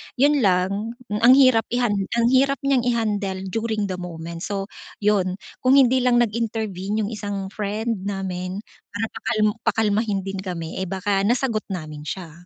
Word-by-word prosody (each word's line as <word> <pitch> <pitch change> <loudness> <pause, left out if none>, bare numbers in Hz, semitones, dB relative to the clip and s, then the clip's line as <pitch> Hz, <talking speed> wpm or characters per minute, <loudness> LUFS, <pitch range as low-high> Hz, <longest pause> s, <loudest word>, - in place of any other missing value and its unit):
'yon 285 +2 +4
lang 200 +3 +1 0.2
ang 230 +4 +6
hirap 255 -4 +5
ihan 245 -2 +1 0.2
ang 235 0 +3
hirap 275 +1 +3
niyang 275 -3 +3
i-handle 205 -5 -1
during 220 -1 -1
the 180 - -4
moment. 165 -1 -7
So, 195 +1 -3 0.4
'yon 190 -3 +2 0.3
kung 255 +1 +5
hindi 260 -1 +5
lang 250 -1 +3
nag-intervene 215 -2 -2
yung 205 - -4
isang 205 -3 -4
friend 215 0 -2
namin 190 0 -4 0.3
para 205 +2 -2
pakal-pakalmahin 215 -2 0
din 195 0 -4
kami. 175 -3 -5
Eh, 190 - -2
baka 195 +1 0
nasagot 240 -2 0
namin 155 -5 -6
siya. 175 -3 -5
210 Hz, 150 wpm, -23 LUFS, 190-230 Hz, 0.4 s, ang